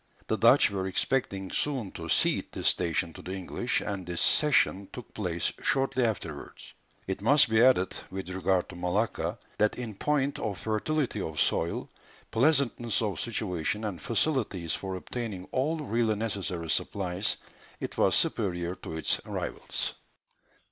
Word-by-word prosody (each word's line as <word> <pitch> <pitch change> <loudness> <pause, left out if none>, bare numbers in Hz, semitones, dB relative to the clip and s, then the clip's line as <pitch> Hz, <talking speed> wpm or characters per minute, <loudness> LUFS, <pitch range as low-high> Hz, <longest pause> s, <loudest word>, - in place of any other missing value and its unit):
The - - 0
Dutch - - +6
were 95 -1 -2
expecting 95 -1 0
soon 130 -10 -1
to - - -7
cede - - +2
this - - +2
station 85 0 0
to - - -10
the 95 - -6
English, 95 +6 -1
and 100 -2 -3
this 85 -1 -4
cession 115 -10 +3
took 125 - -10
place 90 -5 -1
shortly 135 -1 +2
afterwards. 85 -10 -4 0.3
It 95 0 -3
must 140 +2 +6
be 110 0 +5
added, 120 -7 +5 0.2
with 95 -1 -5
regard 95 0 +1
to 95 - -9
Malacca, 90 +6 -1 0.2
that 105 0 +3
in 120 -3 -5
point 140 +5 0
of 100 -3 -2
fertility 110 +3 -1
of 80 -3 -4
soil, 85 - +1 0.4
pleasantness 120 -4 +2
of 100 -6 -2
situation 105 -3 -2
and 100 -5 -4
facilities 115 - 0
for 95 -1 -3
obtaining 100 -1 -5
all 150 +5 +1
really 115 -7 +1
necessary 100 -6 -3
supplies, 95 0 0 0.4
it - - -5
was - - +4
superior 90 -4 +1
to 80 -3 -7
its 80 - +1
rivals. - - -2
100 Hz, 150 wpm, -29 LUFS, 90-120 Hz, 0.4 s, Dutch